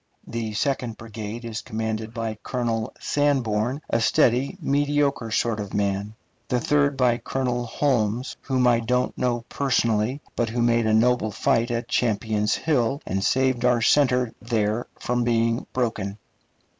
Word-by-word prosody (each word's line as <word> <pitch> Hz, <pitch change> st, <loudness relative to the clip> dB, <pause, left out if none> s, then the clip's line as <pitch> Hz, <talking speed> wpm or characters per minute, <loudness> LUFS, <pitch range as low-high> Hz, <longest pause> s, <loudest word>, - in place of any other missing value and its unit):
The 115 Hz, -2 st, -4 dB
second 125 Hz, -2 st, -1 dB
brigade 110 Hz, +1 st, -7 dB
is 110 Hz, -1 st, -4 dB
commanded 110 Hz, 0 st, -3 dB
by 115 Hz, -2 st, -4 dB
Colonel 115 Hz, -3 st, -2 dB
Sanborn, 130 Hz, -2 st, 0 dB
a 115 Hz, -, +1 dB
steady, 125 Hz, -, +2 dB
mediocre 145 Hz, -4 st, +1 dB
sort 110 Hz, 0 st, 0 dB
of 100 Hz, -2 st, -5 dB
man; 100 Hz, +1 st, -1 dB, 0.3 s
the 125 Hz, -, +1 dB
third 145 Hz, +2 st, +2 dB
by 125 Hz, -2 st, +3 dB
Colonel 125 Hz, -2 st, -2 dB
Holmes, 120 Hz, -2 st, 0 dB
whom 130 Hz, -2 st, +1 dB
I 120 Hz, -1 st, +4 dB
don't 125 Hz, +2 st, 0 dB
know 120 Hz, -2 st, 0 dB
personally, 115 Hz, -2 st, +1 dB, 0.2 s
but 115 Hz, -1 st, 0 dB
who 120 Hz, +1 st, 0 dB
made 115 Hz, -1 st, +3 dB
a 110 Hz, -, +2 dB
noble 120 Hz, 0 st, +3 dB
fight 115 Hz, +3 st, +1 dB
at 120 Hz, 0 st, -2 dB
Champion's 105 Hz, -2 st, +1 dB
Hill, 135 Hz, -4 st, +1 dB
and 95 Hz, +1 st, -2 dB
saved 130 Hz, 0 st, +2 dB
our 125 Hz, -2 st, +3 dB
center 125 Hz, -4 st, +3 dB
there 110 Hz, 0 st, -1 dB
from 120 Hz, 0 st, -1 dB
being 115 Hz, 0 st, +1 dB
broken. 110 Hz, -5 st, -2 dB
120 Hz, 145 wpm, -24 LUFS, 110-125 Hz, 0.3 s, I